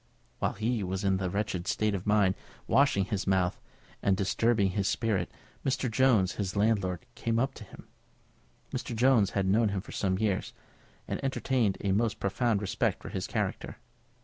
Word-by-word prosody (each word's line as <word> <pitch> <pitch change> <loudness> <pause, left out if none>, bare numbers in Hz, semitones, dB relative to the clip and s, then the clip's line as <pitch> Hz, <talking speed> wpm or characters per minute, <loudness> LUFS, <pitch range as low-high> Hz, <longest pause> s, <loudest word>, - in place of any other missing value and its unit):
While - - 0
he 110 +1 -1
was 95 +2 -3
in 95 -1 +2
this 95 -2 -2
wretched 100 -3 -2
state 110 -1 +1
of 95 -1 -4
mind, 105 -3 +4 0.3
washing 135 -9 +3
his 100 0 -3
mouth, 95 -2 +1 0.4
and 95 -1 +2
disturbing 105 0 +2
his 100 0 0
spirit, 105 -6 0 0.3
Mr. 130 -2 0
Jones, 110 -7 +3
his 100 -1 -2
landlord, 100 -4 +1
came 115 -1 -1
up 135 +3 +1
to 110 - -10
him. 100 - -14 0.8
Mr. 115 - -4
Jones 115 -4 +4
had 100 - +2
known 105 +3 +3
him 100 -2 -2
for - - -12
some 95 -2 0
years, 105 -2 -1 0.5
and - - -4
entertained 130 -6 +1
a 100 - 0
most 110 +2 +1
profound 105 +1 0
respect 100 - 0
for - - -6
his - - -3
character. - - -3
105 Hz, 175 wpm, -29 LUFS, 95-115 Hz, 0.8 s, mind